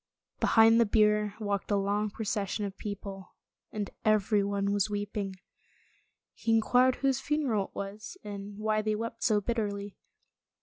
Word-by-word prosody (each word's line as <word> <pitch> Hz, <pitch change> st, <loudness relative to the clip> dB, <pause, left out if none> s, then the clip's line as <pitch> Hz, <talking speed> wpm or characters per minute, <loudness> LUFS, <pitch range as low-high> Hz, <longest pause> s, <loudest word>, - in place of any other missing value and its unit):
Behind 225 Hz, +1 st, +6 dB
the 230 Hz, -, +3 dB
bier 210 Hz, -1 st, +3 dB
walked 205 Hz, -2 st, -2 dB
a 205 Hz, -, +2 dB
long 205 Hz, +2 st, 0 dB
procession 205 Hz, -1 st, -2 dB
of 195 Hz, -1 st, -6 dB
people, 200 Hz, -2 st, -7 dB, 0.4 s
and 210 Hz, -2 st, -4 dB
everyone 200 Hz, -1 st, +2 dB
was 205 Hz, +1 st, +1 dB
weeping. 205 Hz, -1 st, -3 dB, 1.0 s
He 225 Hz, -, -1 dB
inquired 250 Hz, +3 st, +4 dB
whose 270 Hz, -1 st, +1 dB
funeral 270 Hz, -10 st, 0 dB
it -, -, -19 dB
was, 205 Hz, -, -6 dB
and 200 Hz, 0 st, -7 dB
why 215 Hz, 0 st, +1 dB
they 215 Hz, 0 st, 0 dB
wept 230 Hz, +1 st, -5 dB
so 215 Hz, -2 st, +3 dB
bitterly. 205 Hz, -2 st, -3 dB
210 Hz, 140 wpm, -30 LUFS, 200-220 Hz, 1.0 s, Behind